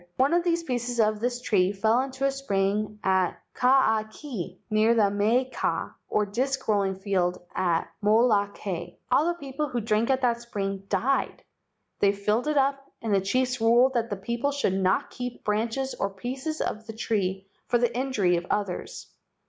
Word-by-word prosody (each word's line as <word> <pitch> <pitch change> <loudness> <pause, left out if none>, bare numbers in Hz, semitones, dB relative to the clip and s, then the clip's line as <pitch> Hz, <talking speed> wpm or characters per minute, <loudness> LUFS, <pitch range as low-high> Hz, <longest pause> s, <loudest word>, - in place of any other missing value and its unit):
One 270 +5 +3
of 345 0 +3
the 340 -1 +2
pieces 245 -3 -2
of 215 -1 +3
this 245 +2 -1
tree 195 -6 +2
fell 220 +4 +2
into 265 0 -3
a 275 - +3
spring 210 -5 -1
at 190 -1 +2 0.2
Kaakee 220 - +1
near 215 +2 +4
the 205 -3 +3
maika, 230 +6 0 0.2
or 210 - +2
disc 260 +7 -1
roll¬ 205 -2 +2
ing 190 - -2
field, 190 -2 0 0.2
on 175 -3 +1 0.2
Molokai. 205 -5 +1 0.2
All 290 +6 +4
the 345 - 0
people 280 +1 -3
who 245 - -1
drank 220 +1 +1
at 265 0 +2
that 235 -2 +1
spring 195 -4 -4
died. 250 +8 0 0.6
They 200 0 +4
filled 210 +6 0
it 305 -1 +1
up 275 0 +2 0.2
and 220 -2 0
the 195 - +3
chiefs 255 +5 0
ruled 240 +3 +5
that 235 -2 0
the 205 - -3
people 235 +8 -1
should 280 -9 0
not 190 0 +1
keep 245 -1 -6
branches 225 +5 -1
or 200 - -2
pieces 260 +10 -4
of 220 +1 -3
the 225 - -6
tree 195 -4 -1 0.2
for 240 - +3
the 240 0 0
injury 225 -9 +1
of 175 +1 -5
others. 200 -4 -3
225 Hz, 175 wpm, -26 LUFS, 200-255 Hz, 0.6 s, ruled